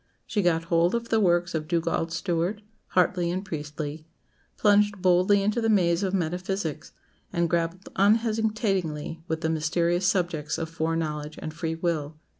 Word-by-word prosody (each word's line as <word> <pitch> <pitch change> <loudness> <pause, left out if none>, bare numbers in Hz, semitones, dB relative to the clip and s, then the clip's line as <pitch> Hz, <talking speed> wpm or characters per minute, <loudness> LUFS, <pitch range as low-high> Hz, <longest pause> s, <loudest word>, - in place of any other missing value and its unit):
She 210 - 0
got 165 -3 +2
hold 170 +3 +2
of 235 0 -3
the 225 - +3
works 175 -3 +2
of 155 -1 -2
Dugald 165 0 0
Stewart, 175 +4 -1 0.2
Hartley, 180 -1 +2
and 185 +3 -2
Priestley; 150 -2 -5 0.5
plunged 205 -1 +3
boldly 185 +2 +4
into 210 +4 +1
the 225 - +1
maze 175 -4 +3
of 195 -2 0
metaphysics, 180 -2 -2 0.4
and 170 0 +1
grappled 170 +3 -1
unhesitatingly 210 -7 +1
with 160 -1 -2
the 160 - 0
mysterious 170 +3 +1
subjects 170 -5 0
of 165 0 -4
fore 165 0 -1
knowledge 150 -2 -3
and 155 - -6
free 165 0 -3
will. 160 -3 -2
170 Hz, 155 wpm, -26 LUFS, 160-195 Hz, 0.5 s, boldly